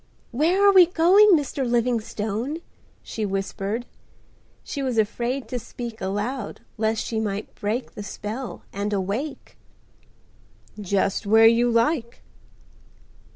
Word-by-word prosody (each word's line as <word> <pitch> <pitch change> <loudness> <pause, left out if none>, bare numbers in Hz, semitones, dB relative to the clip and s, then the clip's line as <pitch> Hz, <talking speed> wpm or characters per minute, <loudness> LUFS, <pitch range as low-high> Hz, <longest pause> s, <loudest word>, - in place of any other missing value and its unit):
"Where 345 +10 +3
are 400 - +6
we 365 -3 +8
going, 370 +5 +6
Mr. 280 -1 -3
Livingstone?" 235 +1 -1 0.5
she 220 - -5
whispered. 195 +3 -3 0.8
She 280 - -5
was 255 -4 -1
afraid 240 +5 -1
to 250 - -2
speak 235 0 -8
aloud 205 +5 -3
lest 220 0 -1
she 225 - -2
might 205 -1 -3
break 225 +4 -3
the - - -7
spell 220 +4 -6
and 205 +1 -2
awake. 205 +10 -4 1.2
"Just 200 +1 0
where 220 +2 +6
you 235 +2 +5
like." 235 +1 0
230 Hz, 115 wpm, -24 LUFS, 210-265 Hz, 1.2 s, we